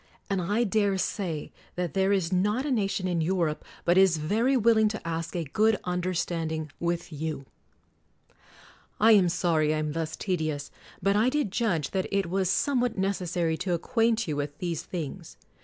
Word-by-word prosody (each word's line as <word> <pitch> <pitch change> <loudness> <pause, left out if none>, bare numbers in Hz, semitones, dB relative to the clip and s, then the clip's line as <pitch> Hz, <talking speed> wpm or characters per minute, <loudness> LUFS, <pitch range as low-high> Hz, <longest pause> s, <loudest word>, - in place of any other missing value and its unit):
And 195 -2 +1
I 205 +7 +1
dare 205 -2 +1
say 180 -5 -3 0.2
that 180 -2 -2
there 195 0 +2
is 190 -3 +1
not 210 +8 +1
a 295 - -1
nation 195 -5 0
in 175 -2 0
Europe 165 -3 0 0.2
but 175 +2 +5
is 190 -4 +5
very 225 - +1
will 230 -1 +4
ing 215 - +4
to 215 -5 -4
ask 165 +1 -3
a 170 - -1
good 210 +9 +2
understanding 170 -3 -2
with 170 -1 -2
you. 150 -2 -4 1.5
I 225 +2 +6
am 195 -5 +6
sorry 160 -3 +1
I - - -1
am 155 -1 -1
thus 160 0 -3
tedious: 155 -7 -2 0.3
but 200 +1 +3
I 220 +4 +4
did 285 -7 -1
judge 185 - 0
that 190 -1 -1
it 195 -4 0
was 190 -1 +1
somewhat 245 -1 +1
necessary 180 -4 0
to 185 0 -1
ac 170 - -5
quaint 230 -2 +1
you 150 - -1
with 145 0 -4
these 170 -3 -3
things. 165 -6 -6
180 Hz, 180 wpm, -27 LUFS, 165-205 Hz, 1.5 s, I